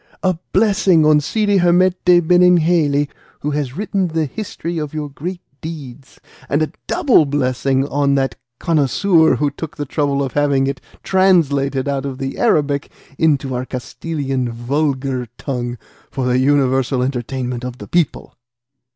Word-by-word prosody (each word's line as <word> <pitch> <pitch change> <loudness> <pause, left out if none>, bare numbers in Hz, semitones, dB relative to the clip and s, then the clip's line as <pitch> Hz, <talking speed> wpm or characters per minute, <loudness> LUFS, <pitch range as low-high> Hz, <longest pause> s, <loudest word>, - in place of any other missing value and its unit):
A 185 -3 +1
blessing 190 -5 +3
on 155 -1 +5
Cide 205 +5 +1
Hamete 180 0 +4
Benengeli, 170 -5 +4 0.3
who 150 - -2
has 145 -1 -3
written 195 -2 -1
the 160 -1 -1
history 175 - -5
of 150 0 -5
your 150 -1 -3
great 175 +6 -6 0.2
deeds, 145 -5 -9 0.3
and 145 +2 +2
a 155 - -3 0.2
double 290 - +4
blessing 135 -1 0
on 140 -1 +1
that 135 -1 0 0.2
connoisseur 160 +2 +3
who 145 -1 0
took 155 +2 -8
the 145 - -3
trouble 140 -1 0
of 135 - -4
having 140 -2 +2
it 135 -1 -3 0.2
translated 145 -8 +2
out 140 -1 -1
of 135 -2 -6
the 135 0 -5
Arabic 145 -1 +1 0.3
into 140 -4 +1
our 125 0 -2
Castilian 135 0 -4
vulgar 130 +1 -2
tongue 125 -3 -4 0.3
for 130 -2 -3
the 125 0 +2
universal 130 -2 +2
entertainment 125 -1 -3
of 125 0 -6
the - - -10
people!" 170 -5 -1
145 Hz, 145 wpm, -18 LUFS, 135-165 Hz, 0.3 s, on